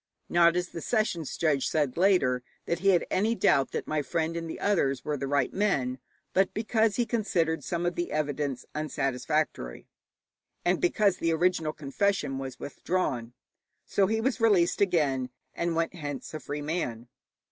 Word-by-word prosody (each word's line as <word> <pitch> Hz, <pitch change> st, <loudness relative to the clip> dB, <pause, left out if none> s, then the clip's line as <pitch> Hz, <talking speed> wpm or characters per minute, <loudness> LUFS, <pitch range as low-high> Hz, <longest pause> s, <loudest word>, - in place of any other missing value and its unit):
Not, 170 Hz, 0 st, +5 dB
as 180 Hz, 0 st, -1 dB
the 165 Hz, -, -7 dB
sessions 195 Hz, -, -1 dB
judge 150 Hz, -5 st, +2 dB
said 145 Hz, -5 st, 0 dB
later, 170 Hz, -9 st, +3 dB, 0.2 s
that 170 Hz, -, -1 dB
he 195 Hz, -, -1 dB
had 185 Hz, -3 st, +4 dB
any 215 Hz, +5 st, +2 dB
doubt 135 Hz, -10 st, +3 dB
that -, -, -3 dB
my 155 Hz, -1 st, 0 dB
friend 160 Hz, +3 st, -1 dB
and 165 Hz, -1 st, -4 dB
the -, -, -6 dB
others 140 Hz, -10 st, +1 dB
were 150 Hz, -, 0 dB
the 140 Hz, -1 st, -3 dB
right 140 Hz, -2 st, +1 dB
men, 135 Hz, -11 st, 0 dB, 0.3 s
but 190 Hz, 0 st, +2 dB
because 220 Hz, 0 st, +2 dB
he 240 Hz, -, +1 dB
considered 190 Hz, -8 st, 0 dB
some 175 Hz, -1 st, -2 dB
of 175 Hz, -, +1 dB
the 175 Hz, +1 st, -3 dB
evidence 145 Hz, -3 st, -2 dB
unsatisfactory, 145 Hz, -, -2 dB, 0.8 s
and 175 Hz, 0 st, +2 dB
because 195 Hz, +2 st, +3 dB
the 165 Hz, -, 0 dB
original 165 Hz, -1 st, +1 dB
confession 150 Hz, -1 st, -1 dB
was 130 Hz, -2 st, -6 dB
withdrawn. 135 Hz, -7 st, -2 dB, 0.5 s
So 195 Hz, -1 st, +2 dB
he 220 Hz, +2 st, 0 dB
was 255 Hz, 0 st, 0 dB
released 200 Hz, -7 st, +3 dB
again, 145 Hz, -9 st, +2 dB, 0.2 s
and 170 Hz, -1 st, -1 dB
went 165 Hz, +1 st, 0 dB
hence 145 Hz, -5 st, -6 dB
a 155 Hz, -, -4 dB
free 145 Hz, 0 st, -5 dB
man. 135 Hz, -7 st, -3 dB
165 Hz, 170 wpm, -28 LUFS, 140-185 Hz, 0.8 s, Not